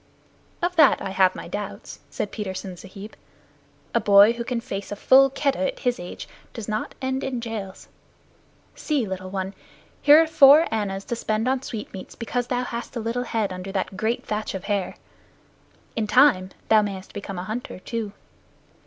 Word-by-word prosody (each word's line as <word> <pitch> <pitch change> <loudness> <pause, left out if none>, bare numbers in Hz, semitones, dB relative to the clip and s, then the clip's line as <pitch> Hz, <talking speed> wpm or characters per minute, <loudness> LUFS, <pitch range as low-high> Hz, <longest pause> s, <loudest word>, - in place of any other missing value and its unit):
"Of 360 +1 0
that 310 -4 +6
I 195 - -4
have 190 -1 +3
my - - -7
doubts," 205 +3 -6
said 205 - -4
Petersen 190 -3 -5
Sahib. 195 +4 -11 0.8
"A 235 - +3
boy 205 +1 +7
who 235 0 -4
can 235 0 -2
face 205 -5 -6
a - - -2
full 270 +6 +6
Keddah 275 0 0
at - - -17
his 245 -2 0
age 175 0 -8 0.3
does 230 -3 -6
not 215 0 -3
end 260 0 -1
in 260 -2 -2
jails. 220 -5 -6 0.9
See, 290 -6 -1
little 185 -1 -5
one, 190 0 -3 0.5
here 295 +2 +8
are 325 - +5
four 310 0 +7
annas 195 -3 -2
to 235 - -3
spend 220 0 -1
in 260 0 +1
sweetmeats 215 -7 -7
because 245 +1 -3
thou 250 0 -1
hast 235 0 -6
a - - -2
little 230 +2 -2
head 215 -5 -1
under 185 +1 -6
that 190 0 -2
great 220 +5 -1
thatch 210 -1 -3
of 190 - -5
hair. 200 -3 -2 1.0
In 220 -2 -1
time 245 -7 +5 0.2
thou 220 -1 +6
mayest 195 -2 -5
become 200 -2 -6
a 180 - -4
hunter 220 +6 -5
too." 220 +2 -4
220 Hz, 180 wpm, -24 LUFS, 195-245 Hz, 1.0 s, here